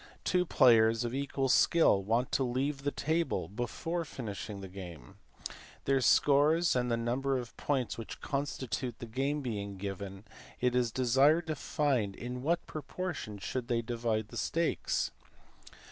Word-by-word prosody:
Two 180 -1 +1
players 115 -4 +5
of 120 0 -3
equal 135 0 -1
skill 130 -5 +4
want 115 +5 0
to 135 - +2
leave 135 +3 -1
the 145 - 0
table 160 +3 -1
before 165 - -3
finishing 105 -7 -6
their 95 - -7
game. 90 -5 -10 0.7
Their 135 -1 +3
scores 150 +6 +4
and 125 -1 +1
the 115 - +1
number 130 +4 0
of 120 -2 -6
points 130 -5 -1
which 115 - -7
constitute 130 -4 -3
the - - -7
game 135 +6 -1
being 100 -6 -4
given, 100 0 -6 0.4
it 125 0 +1
is 125 -2 +2
desired 135 +7 +4
to 155 -1 -2
find 130 -9 0
in 125 +1 -5
what 170 +5 0
proportion 155 - -5
should 120 +5 -4
they 120 -2 0
divide 115 -2 -1
the - - -8
stakes. 165 0 0
125 Hz, 150 wpm, -31 LUFS, 115-145 Hz, 0.7 s, players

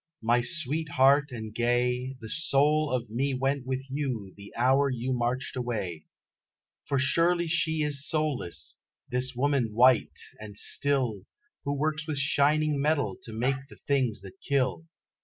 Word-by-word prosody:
My 120 +2 +3
sweet 155 +2 -1
heart 140 +2 +4
and 110 -3 -6
gay, 125 +2 0
The 110 - -7
soul 150 +2 +2
of 120 -4 -2
me 135 +4 0
went 135 0 -1
with 130 0 -2
you 125 -9 -3
the 100 0 -12
hour 135 +3 +3
you 130 0 -2
marched 125 +2 -1
away, 105 -10 -4 0.8
For 140 - +1
surely 170 +6 +3
she 160 -2 +1
is 145 -1 0
soulless, 145 - -2 0.3
this 125 +1 -1
woman 130 -4 +1
white, 125 +1 +4 0.2
and 105 -2 -9
still, 125 -9 0 0.4
Who 140 - 0
works 150 +1 -1
with 155 -2 -2
shining 145 +1 +2
metal 140 -10 +1
to 115 - -6
make 130 +5 -1
the - - -14
things 130 -8 +1
that 100 +6 -13
kill. 140 +3 0
130 Hz, 150 wpm, -28 LUFS, 120-145 Hz, 0.8 s, heart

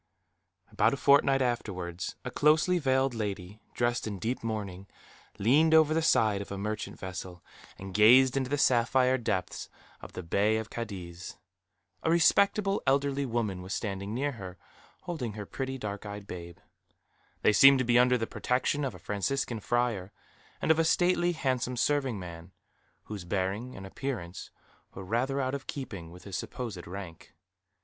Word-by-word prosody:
About - - +2
a - - -10
fortnight 140 0 +4
afterwards, 90 -8 -3
a - - -4
closely 155 +4 +3
veiled 130 -2 +1
lady, 105 -2 -5
dressed 120 -1 0
in 105 -2 -4
deep 115 +7 -3
mourning, 100 -4 -4 0.5
leaned 150 +10 +4
over 155 -1 +5
the 165 - +2
side 110 -10 +3
of 100 - -8
a 100 - -4
merchant 105 +2 -4
vessel, 90 -1 -7 0.3
and 95 0 -8
gazed 125 +5 +6
into 130 -2 -1
the 145 - 0
sapphire 130 0 +3
depths 95 -6 -3 0.3
of - - -11
the 90 - -6
Bay 105 +6 +2
of 110 0 -5
Cadiz. 90 -6 -7 0.6
A - - 0
respectable 195 +4 +3
elderly 140 0 +1
woman 110 -6 -2
was 95 +2 -4
standing 100 -2 -4
near 145 +3 0
her, 95 -7 -9 0.5
holding 155 - -4
her 105 0 -6
pretty 135 +4 -4
dark 105 -4 -5
eyed 105 -1 -7
babe. 85 -3 -8 0.9
They 110 - +5
seemed 135 +5 +8
to 130 - 0
be 120 0 +4
under 125 0 +4
the 115 - -2
protection 130 +5 -1
of 135 - -3
a - - -9
Franciscan 115 +3 -2
friar; 115 -4 -1 0.5
and - - +2
of 160 - +3
a - - +4
stately, 175 +1 +2
handsome 130 -5 -1
serving 135 -3 +1
man, 85 -1 -9 0.5
whose 105 -4 -7
bearing 100 +7 -2
and 95 - -8
appearance 95 -5 -5 0.5
were 95 - -7
rather 125 +7 0
out 130 -1 -1
of 140 0 -5
keeping 100 - -6
with 90 +2 -13
his 100 -3 -7
supposed 105 -6 -5
rank. 90 -3 -9
115 Hz, 165 wpm, -29 LUFS, 95-135 Hz, 0.9 s, seemed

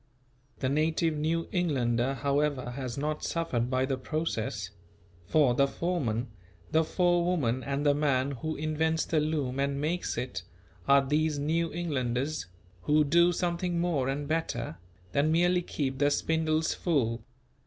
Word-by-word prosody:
The 130 - +1
native 155 +3 +1
New 160 +2 -1
Englander 130 -7 +1
however 140 -2 0
has 125 -1 -5
not 150 +2 -2
suffered 125 -8 -1
by 130 0 +1
the 135 -1 -2
process; 115 - -3 0.6
for 145 - +4
the 140 +3 +3
foreman, 135 -8 -2 0.4
the 160 +1 +4
forewoman 175 -8 +1
and 140 +3 -2
the 145 - +5
man 140 -2 +1
who 155 +4 -4
invents 160 +1 0
the 160 - +1
loom 150 -4 -1
and 140 0 0
makes 165 +5 -1
it, 120 -6 -3 0.5
are 140 0 +5
these 150 +2 +1
New 160 +3 0
Englanders, 145 - -2 0.3
who 150 +8 +3
do 170 +4 +4
something 175 0 -1
more 160 -7 0
and 140 +1 -2
better 120 - -2 0.3
than 145 +2 +2
merely 175 +2 +3
keep 135 -6 -3
the 145 0 +4
spindles 160 +1 +1
full. 120 -9 0
150 Hz, 145 wpm, -29 LUFS, 130-160 Hz, 0.6 s, the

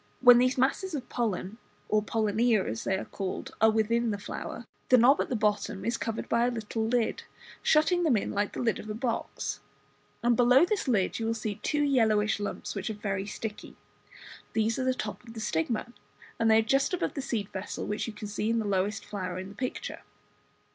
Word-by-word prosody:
When 245 -1 +8
these 255 +1 +2
masses 300 +7 +1
of 255 -4 -5
pollen, 220 -2 -2 0.3
or 215 0 +2
pollinia 220 0 +1
as 110 +1 -4
they 190 - +1
are - - -5
called, 195 -2 -5
are 220 - +7
within 225 +2 +1
the 205 - -1
flower, 225 +3 -6 0.2
the 255 - +7
knob 255 +4 +6
at - - -3
the 255 - 0
bottom 210 -2 0
is 235 - +1
covered 225 -1 -3
by 235 +1 +2
a - - +2
little 225 -1 -3
lid, 235 -1 0 0.4
shutting 320 +4 +3
them 300 -9 +3
in - - -2
like 205 0 -1
the - - -4
lid 225 -2 +1
of 215 - -8
a 210 - -3
box, 230 0 -3 0.6
and 240 - +4
just - - -1
below 250 +6 +6
this 400 -4 -1
lid 210 -6 +1
you 225 - -1
will 230 - 0
see 215 -2 -4
two 295 -1 +1
yellowish 220 -7 +3
lumps, 205 - -4
which 195 0 -3
are 220 - -3
very 200 -1 -3
sticky. 210 0 -6 0.8
These 225 +2 +1
are 260 - 0
the 260 0 +2
top 215 -2 -5
of 230 -1 -12
the - - -5
stigma, 215 +4 -1 0.5
and 225 -1 +3
they 220 - +6
are - - +6
just 270 - +2
above - - -2
the 280 - -3
seed 225 -7 -2
vessel, 190 +1 -5
which 210 +3 -2
you 225 - -5
can 210 0 -7
see 210 +1 -2
in 230 - +2
the 220 - -1
lowest 200 +1 0
flower 185 -3 -4
in 190 +1 -6
the - - -11
picture. 255 +3 -4
225 Hz, 220 wpm, -29 LUFS, 210-245 Hz, 0.8 s, When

